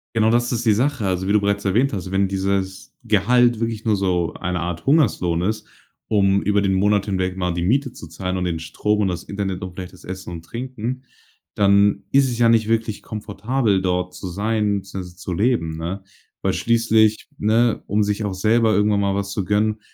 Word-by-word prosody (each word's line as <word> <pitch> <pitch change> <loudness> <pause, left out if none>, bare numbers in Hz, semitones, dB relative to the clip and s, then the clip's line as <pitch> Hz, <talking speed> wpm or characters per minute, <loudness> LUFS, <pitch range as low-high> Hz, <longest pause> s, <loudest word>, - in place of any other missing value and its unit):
Genau 110 0 +3
das 120 +1 +2
ist 120 -1 -2
die 110 - +5
Sache. 125 -1 0
Also 95 0 -1
wie 100 - +2
du 105 - +4
bereits 100 0 0
erwähnt 120 +8 +2
hast, 95 -3 -5
wenn 95 0 +2
dieses 95 0 -2
Gehalt 120 +2 +3
wirklich 115 -1 -2
nur 110 -2 +2
so 90 -3 0
eine 90 0 -3
Art 85 -1 -4
Hungerslohn 105 - +2
ist, 105 +3 -2 0.4
um 100 -2 +2
über 105 0 +2
den 95 -1 +1
Monat 100 +1 +2
hinweg 95 -2 -1
mal 90 -1 -1
die 85 0 -2
Miete 130 +7 +1
zu 85 - -10
zahlen 90 +3 -4
und 90 - -2
den 85 -2 -2
Strom 105 +6 -1
und 100 - +2
das 90 -2 -3
Internet 95 -2 -4
und 95 -1 -6
vielleicht 90 0 -8
das 95 - -16
Essen 95 0 -7
und 85 -1 -8
Trinken, 125 +4 -5 0.5
dann 100 0 +3
ist 135 -1 +4
es 120 - -3
ja 120 -1 +4
nicht 115 -2 +3
wirklich 115 -2 0
komfortabel, 105 0 -1
dort 90 -1 -1
zu 95 - -7
sein 105 +2 0
beziehungsweise 95 -2 -8
zu 90 - -5
leben, 85 -6 0
ne? 90 +4 -5 0.4
Weil - - +1
schließlich, 110 -1 +2
ne, 115 +2 +2
um 105 +1 +2
sich 105 +1 -1
auch 100 - -2
selber 110 +3 +2
irgendwann 105 0 +2
mal 100 -1 +1
was 100 0 -2
zu 100 -2 -2
gönnen, 105 +2 +1
100 Hz, 210 wpm, -21 LUFS, 95-110 Hz, 0.5 s, die